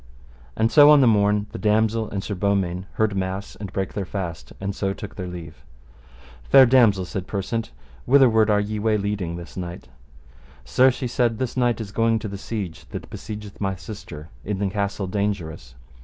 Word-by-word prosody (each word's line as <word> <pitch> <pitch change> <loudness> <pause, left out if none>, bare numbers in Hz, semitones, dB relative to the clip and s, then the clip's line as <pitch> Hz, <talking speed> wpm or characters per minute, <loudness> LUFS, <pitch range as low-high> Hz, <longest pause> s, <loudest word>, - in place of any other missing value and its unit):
And 115 +1 +2
so 145 -1 +8
on 150 -1 +8
the 135 - +5
morn 105 -2 +3
the - - -7
damosel 110 +1 +1
and 100 -1 -4
Sir 105 - -4
Beaumains 95 -2 0
heard 110 -2 0
mass 95 +1 -3
and 100 -3 -7
brake 95 -2 -3
their 100 - -2
fast, 90 -3 -5
and 100 +1 -3
so 95 -1 -1
took 105 - -8
their 90 -2 -5
leave. 85 -3 -9 0.9
Fair 135 -1 +9
damosel, 115 -7 +4
said 95 0 -5
Persant, 110 +3 -3 0.4
whitherward 120 -5 +5
are 105 -1 +4
ye 105 +1 -2
way 110 0 +2
leading 100 -4 -2
this 85 -1 -9
knight? 90 -6 -7 0.8
Sir, 130 - +5
she 130 0 -3
said, 120 -2 +1
this 130 0 -3
knight 120 -2 +1
is 105 -3 -6
going 115 +1 +2
to 110 - -5
the 100 -1 -6
siege 100 -7 -5
that - - -8
besiegeth 105 -1 -8
my 95 -1 0
sister 85 -4 -9
in 105 -1 -3
the 100 -1 -1
Castle 100 -1 -2
Dangerous. 90 - -3
100 Hz, 185 wpm, -23 LUFS, 95-110 Hz, 0.9 s, Fair